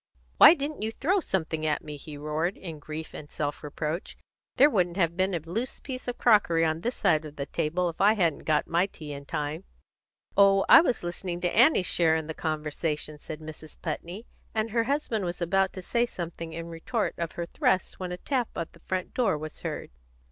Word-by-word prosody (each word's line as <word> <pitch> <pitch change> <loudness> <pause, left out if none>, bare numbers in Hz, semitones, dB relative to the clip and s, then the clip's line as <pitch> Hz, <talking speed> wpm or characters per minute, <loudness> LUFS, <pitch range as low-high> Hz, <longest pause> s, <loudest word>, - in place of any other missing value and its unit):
"Why - - +10
didn't 290 -2 -4
you 220 +1 -1
throw 360 - +1
something 160 - -2
at 155 -1 0
me," 150 -1 -7
he 145 +1 -9
roared, 155 +5 -2
in 165 -5 -7
grief 155 +2 -7
and 145 - -9
self 145 -1 -3
reproach. 155 +4 -4 0.4
"There 275 - +7
wouldn't 180 - +1
have 170 -3 +2
been 185 0 +1
a - - 0
loose 205 - -4
piece 255 -2 -7
of 245 - -3
crockery 185 -8 +4
on 160 +1 0
this 240 +6 -1
side 155 0 +3
of 150 -1 -9
the 140 - -3
table 165 +5 -1
if 165 - -4
I 205 +2 +6
hadn't 175 -8 0
got 155 -1 +2
my 170 +3 +2
tea 150 -6 -9
in 140 0 -8
time." 150 +5 -3 0.7
"Oh, 195 -1 +5
I - - +10
was 250 - 0
listening 175 0 -3
to 175 0 0
Annie's 245 - +5
share 165 -2 +3
in 160 -1 -1
the 160 - -5
conversation," 155 -1 -3
said 155 +1 -7
Mrs. 155 0 -9
Putney; 175 +7 -5 0.3
and 220 0 0
her 230 +1 +1
husband 265 -6 -1
was 175 -1 -3
about 190 +2 +2
to 185 - -7
say 240 +5 +1
something 170 -5 -6
in 165 +1 -5
retort 210 +8 -2
of 170 -1 -3
her 170 - -3
thrust 185 +2 0
when 180 -1 -4
a 180 - -4
tap 250 +3 -1
on 170 - -2
the - - -19
front 185 -1 -2
door 220 -10 +2
was 155 0 -7
heard. - - -5
170 Hz, 215 wpm, -27 LUFS, 155-205 Hz, 0.7 s, Why